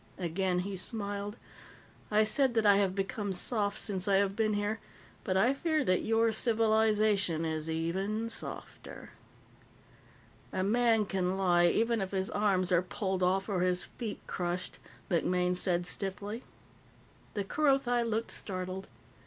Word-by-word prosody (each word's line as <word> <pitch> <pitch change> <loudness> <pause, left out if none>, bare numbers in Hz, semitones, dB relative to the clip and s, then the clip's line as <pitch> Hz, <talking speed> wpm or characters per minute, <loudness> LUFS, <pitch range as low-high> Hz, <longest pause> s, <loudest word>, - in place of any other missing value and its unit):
Again 180 +1 -1
he 195 +1 -4
smiled. 205 +1 -3 0.7
"I 215 0 +4
said 240 +3 +2
that 225 -1 +2
I 200 -1 +6
have 195 -2 +1
become 200 +1 -2
soft 205 +2 0
since 195 -2 -2
I 200 - +4
have 195 0 +2
been 215 -1 +1
here, 205 +2 -1 0.4
but 190 -2 0
I 240 +7 +4
fear 310 +1 0
that 185 -7 +2
your 225 0 +2
civilization 215 -6 +2
is 160 0 -2
even 190 +7 -2
softer." 230 - -4 1.4
"A 185 - -1
man 225 +1 +3
can 190 -1 -1
lie, 175 -2 +4
even 230 +4 +1
if 190 - -2
his 190 0 0
arms 195 -3 +1
are 175 -1 +4
pulled 190 0 -3
off 190 +2 +1
or 200 -4 -1
his 180 0 +1
feet 225 -4 -6
crushed," 175 0 -3 0.3
MacMaine 180 +1 +1
said 175 -1 0
stiffly. 200 +5 -4 0.9
The 205 - -1
Kerothi 270 0 +2
looked 230 -1 -1
startled. 185 0 -4
200 Hz, 145 wpm, -31 LUFS, 185-220 Hz, 1.4 s, I